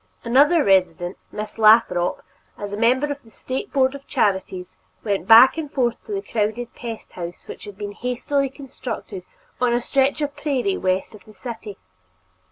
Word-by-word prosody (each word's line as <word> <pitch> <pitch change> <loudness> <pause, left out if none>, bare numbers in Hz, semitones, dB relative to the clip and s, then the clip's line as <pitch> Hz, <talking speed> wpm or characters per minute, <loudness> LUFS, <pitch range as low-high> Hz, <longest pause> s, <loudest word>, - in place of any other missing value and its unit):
Another 285 +7 +4
resident, 185 -3 +2 0.2
Miss 210 +1 -6
Lathrop, 215 -5 +4 0.3
as 205 -1 -6
a - - -1
member 245 +6 +3
of 285 0 -5
the 225 - -20
State 260 - -5
Board 265 -2 +2
of 280 0 -11
Charities, 190 -2 -1 0.3
went 200 -4 -1
back 235 +7 +8
and 300 -3 -5
forth 240 -3 -1
to - - -7
the 395 0 -3
crowded 225 +2 -2
pest 230 -2 -8
house 175 0 -7
which - - -9
had 205 -2 -10
been 205 0 -5
hastily 250 +5 -1
constructed 255 -8 -7 0.4
on 245 -1 +2
a - - +2
stretch 270 +3 +1
of 285 -1 -2
prairie 290 +6 -1
west 185 - -1
of 210 -3 -14
the 215 - -16
city. 225 -5 -8
235 Hz, 175 wpm, -22 LUFS, 205-270 Hz, 0.4 s, back